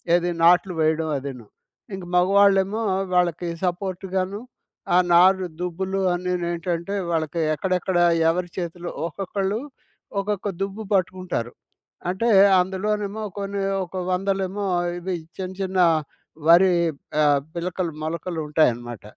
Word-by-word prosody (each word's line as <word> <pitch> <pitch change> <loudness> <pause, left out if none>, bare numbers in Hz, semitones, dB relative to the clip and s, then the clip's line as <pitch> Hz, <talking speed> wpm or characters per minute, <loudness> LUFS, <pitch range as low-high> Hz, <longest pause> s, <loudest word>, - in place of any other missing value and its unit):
ఏది 175 0 +1
నాట్లు 180 +2 +5
వేయడం 160 0 +1
అదీను. 130 -4 -7 0.5
ఇంక 190 - -8
మగవాళ్ళేమో, 195 +3 +4 0.3
వాళ్ళకి 175 -1 +1 0.2
సపోర్ట్ 185 +1 -3
గాను, 190 +3 -1 0.5
ఆ - - +6 0.2
నారు 185 +2 +5
దుబ్బులు 190 +2 -2
అన్ని 180 +1 -2
నేంటంటే, 170 +2 -2 0.2
వాళ్ళకి 160 0 -1
ఎక్కడెక్కడ 185 +2 -1 0.3
ఎవరి 175 +1 -1
చేతిలో 175 0 -4 0.2
ఒక్కొక్కళ్ళు 195 +4 -2 0.6
ఒక్కొక్క 205 0 -2
దుబ్బు 200 +2 -3
పట్టుకుంటారు. 185 -10 -1 0.6
అంటే 200 +6 -1 0.3
అందులోనేమో 205 +3 -1 0.2
కొన్ని, 200 0 -3 0.2
ఒక 175 - -22 0.2
వందలేమో 195 +1 -1 0.3
ఇవి 180 +1 -3 0.2
చిన్న 185 -1 -4
చిన్న 190 -1 -1 0.7
వరి 180 +2 +7 0.5
ఆహ్, 145 -2 +4
పిలకలు, 175 0 -3
మొలకలు 170 +1 -3
ఉంటాయన్నమాట. 120 -7 0
180 Hz, 110 wpm, -23 LUFS, 170-195 Hz, 0.7 s, వరి